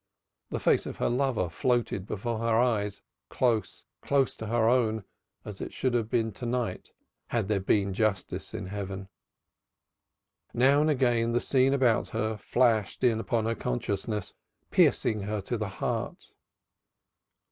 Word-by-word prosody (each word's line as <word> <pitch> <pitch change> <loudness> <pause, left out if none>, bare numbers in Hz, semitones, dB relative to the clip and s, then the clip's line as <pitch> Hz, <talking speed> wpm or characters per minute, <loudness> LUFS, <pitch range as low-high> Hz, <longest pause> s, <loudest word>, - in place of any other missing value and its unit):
The - - -3
face - - +2
of - - -6
her - - 0
lover 125 -7 +1
floated 105 +2 -1
before 110 +2 -3
her 115 -1 +2
eyes, 110 -4 0 0.3
close, 115 -4 0 0.2
close 140 -2 +1
to 110 - -6
her 115 0 +2
own 110 -3 +2 0.4
as 105 -2 -8
it - - -5
should 130 -2 -1
have 115 -3 0
been 115 -2 +1
to 120 - -8
night 120 -6 -2 0.4
had 115 -5 -1
there 105 -1 +1
been 100 0 +1
justice 100 -3 -1
in 110 -3 -4
Heaven. 95 0 -5 1.5
Now 135 +4 +5
and 155 - +2
again 120 -5 +2
the 120 - +3
scene 135 +1 +3
about 125 -4 +2
her 110 0 0
flashed 110 0 +1
in 115 -3 +3
upon 115 -1 0
her 115 - +1
consciousness, 100 - -3 0.4
piercing 110 -1 +3
her 105 +2 -2
to 120 - -3
the 110 -3 -3
heart. 95 - -4
110 Hz, 150 wpm, -28 LUFS, 105-120 Hz, 1.5 s, Now